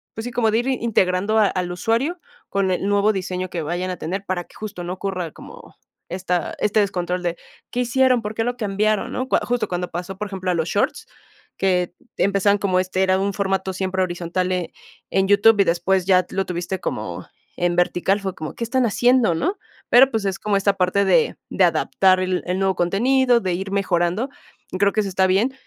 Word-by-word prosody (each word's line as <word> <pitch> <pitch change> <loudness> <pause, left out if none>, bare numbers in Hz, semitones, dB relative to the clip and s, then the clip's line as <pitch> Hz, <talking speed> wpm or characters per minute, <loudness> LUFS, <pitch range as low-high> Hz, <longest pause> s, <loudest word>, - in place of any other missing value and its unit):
pues 225 - -5
sí, 245 - -4
como 235 -2 +1
de 220 - +2
ir 245 - -2
integrando 215 -5 +1
a 215 - +5
al 180 -2 -2
usuario 230 - -1 0.3
con 195 -1 0
el 185 +2 -1
nuevo 205 +1 +3
diseño 185 -1 -3
que 170 - -3
vayan 175 +4 -3
a 180 - -5
tener, 190 +5 -4
para 185 -2 -2
que - - -22
justo 210 -4 -7
no 175 +1 -4
ocurra 185 -3 -4
como - - -13 0.3
esta 180 -1 -2
este 210 +1 +2
descontrol, 180 -3 -1
¿de 175 -1 -2 0.3
qué 245 - -1
hicieron, 255 0 +3
por 210 +1 -4
qué, 225 - -1
lo 245 +1 -2
cambiaron, 210 -1 0
no? 255 - -2
Cua - - +3
justo 245 0 0
cuando 180 0 -3
pasó, 180 +3 -5
por 210 +1 -4
ejemplo, 190 -2 -4
a - - +1
los 160 -1 -1
shorts, 285 +8 0 0.5
que 180 -2 +1 0.2
empezaban 200 +1 +2
como 185 -2 +1
este 185 +1 0
era 190 0 +2
un 200 +1 -1
formato 190 -1 -1
siempre 190 0 -2
horizontal 180 +1 -2
en 180 -3 -1 0.4
en 190 0 +2
YouTube 205 +2 +5
y - - +6
después 175 +1 +1
ya 185 -2 +4
lo 195 0 -1
tuviste 180 +1 -3
como - - -5 0.3
en 175 0 +1
vertical, 180 +3 +1
fue 195 -2 -4
como, 155 -1 -7
¿qué - - -4
están 250 +2 +1
haciendo, 240 -3 +3
no? 365 - -1 0.3
Pero, 260 +2 +7
pues, 220 -3 -1
es 195 -1 -2
como 210 -1 +1
esta 195 0 +2
parte 195 +1 +1
de 465 - +3
de - - +2
adaptar 185 -1 +3
el 185 0 -1
el 180 +1 0
nuevo 195 -1 +1
contenido, 245 +7 +3
de 185 -2 -1
ir 190 +2 -4
mejorando, 190 +4 0 0.5
creo 200 0 +4
que 215 - +2
eso 200 - -3
está 190 0 +2
bien. 205 +8 +2
195 Hz, 210 wpm, -21 LUFS, 180-215 Hz, 0.5 s, Pero